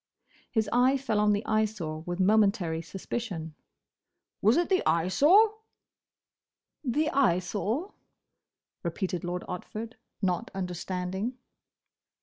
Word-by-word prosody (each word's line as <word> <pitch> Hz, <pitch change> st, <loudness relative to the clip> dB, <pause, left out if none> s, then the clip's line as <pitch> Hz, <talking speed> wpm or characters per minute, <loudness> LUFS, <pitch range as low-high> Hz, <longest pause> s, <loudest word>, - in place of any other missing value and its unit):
His 220 Hz, -2 st, 0 dB
eye 255 Hz, +3 st, +4 dB
fell 240 Hz, -6 st, -1 dB
on 210 Hz, 0 st, +4 dB
the 205 Hz, +1 st, 0 dB
Eyesore 210 Hz, -8 st, -1 dB
with 175 Hz, +1 st, -3 dB
momentary 195 Hz, -5 st, +3 dB
suspicion. 180 Hz, -2 st, -5 dB, 0.9 s
"Was 220 Hz, +7 st, +5 dB
it 345 Hz, -, +2 dB
the 375 Hz, -1 st, +2 dB
Eyesore?" 290 Hz, -, +4 dB, 1.3 s
"The 300 Hz, +4 st, +1 dB
Eyesore?" 215 Hz, -, 0 dB, 0.9 s
repeated 180 Hz, 0 st, -3 dB
Lord 175 Hz, 0 st, -3 dB
Otford, 220 Hz, +6 st, -6 dB, 0.3 s
not 180 Hz, -3 st, -1 dB
understanding. 185 Hz, +5 st, -3 dB
205 Hz, 100 wpm, -28 LUFS, 180-240 Hz, 1.3 s, Was